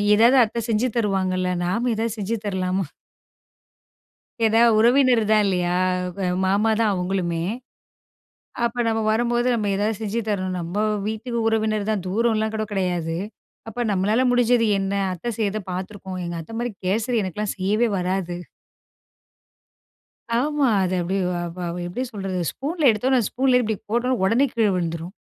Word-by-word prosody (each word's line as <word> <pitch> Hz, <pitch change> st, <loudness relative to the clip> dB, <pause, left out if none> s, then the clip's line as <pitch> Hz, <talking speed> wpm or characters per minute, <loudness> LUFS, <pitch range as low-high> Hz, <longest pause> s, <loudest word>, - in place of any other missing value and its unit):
"எதாவது 235 Hz, +5 st, +5 dB
அத்தை 230 Hz, +2 st, -2 dB
செஞ்சு 225 Hz, +3 st, +2 dB
தருவாங்கல்ல. 185 Hz, -4 st, 0 dB
நாம 230 Hz, +8 st, 0 dB
எதாவது 225 Hz, 0 st, -2 dB
செஞ்சு 210 Hz, +3 st, -1 dB
தரலாமா?" 190 Hz, -1 st, -1 dB, 1.6 s
ஏனா 225 Hz, +1 st, +4 dB, 0.2 s
உறவினர் 245 Hz, +1 st, +5 dB
தான் 215 Hz, -1 st, +5 dB
இல்லையா? 180 Hz, -2 st, 0 dB, 0.4 s
க -, -, -8 dB, 0.3 s
மாமா 200 Hz, +4 st, +2 dB
தான் 220 Hz, -2 st, +3 dB
அவங்களுமே. 180 Hz, -2 st, -1 dB, 1.2 s
அப்போ 235 Hz, +1 st, -3 dB
நம்ம 225 Hz, 0 st, +1 dB
வரும்போது 240 Hz, +2 st, +1 dB
நம்ம 210 Hz, -3 st, -1 dB
ஏதாவது 210 Hz, +1 st, 0 dB
செஞ்சு 220 Hz, +1 st, -2 dB
தரணும். 185 Hz, -3 st, -1 dB
நம்ம 170 Hz, +2 st, -5 dB, 0.3 s
வீட்டு 230 Hz, +2 st, -4 dB
உறவினர் 215 Hz, -1 st, 0 dB
தான் 205 Hz, -4 st, -1 dB
தூரம்லாம் 220 Hz, +2 st, +1 dB
கூட 215 Hz, 0 st, -1 dB
கிடையாது. 175 Hz, -4 st, -1 dB, 0.5 s
அப்போ 235 Hz, +2 st, -4 dB
"நம்மளால 205 Hz, +6 st, +2 dB
முடிஞ்சது 245 Hz, -1 st, +3 dB
என்ன? 195 Hz, 0 st, -2 dB, 0.2 s
அத்த 180 Hz, +7 st, -7 dB
செய்யறதை 215 Hz, -1 st, -1 dB
பார்த்துருக்கோம்." 190 Hz, 0 st, -6 dB
எங்க 170 Hz, 0 st, -4 dB
அத்தை 225 Hz, +8 st, -10 dB
மாதிரி 240 Hz, -1 st, -2 dB
கேசரி 225 Hz, +5 st, +1 dB
எனக்கெல்லாம் 195 Hz, +3 st, -3 dB
செய்யவே 210 Hz, +5 st, +1 dB
வராது. 180 Hz, -1 st, -2 dB, 2.0 s
ஆமா, 295 Hz, +1 st, +1 dB, 0.2 s
அது 185 Hz, 0 st, 0 dB
அப்டி 180 Hz, +3 st, -2 dB, 0.5 s
அ 175 Hz, -, -2 dB, 0.2 s
எப்படி 245 Hz, +9 st, -3 dB
சொல்றது, 195 Hz, -4 st, -4 dB
ஸ்பூன்ல 300 Hz, 0 st, +1 dB
எடுத்தோனே, 255 Hz, +5 st, +2 dB
ஸ்பூன்லேயே 255 Hz, 0 st, +3 dB
இப்படி 220 Hz, -1 st, -1 dB
போட்ட 235 Hz, +3 st, 0 dB
உடனே 255 Hz, -, 0 dB
உடனே 230 Hz, +8 st, +3 dB
கீழே 225 Hz, -3 st, +2 dB
விழுந்துரும். 170 Hz, 0 st, -3 dB
215 Hz, 140 wpm, -23 LUFS, 185-235 Hz, 2.0 s, எதாவது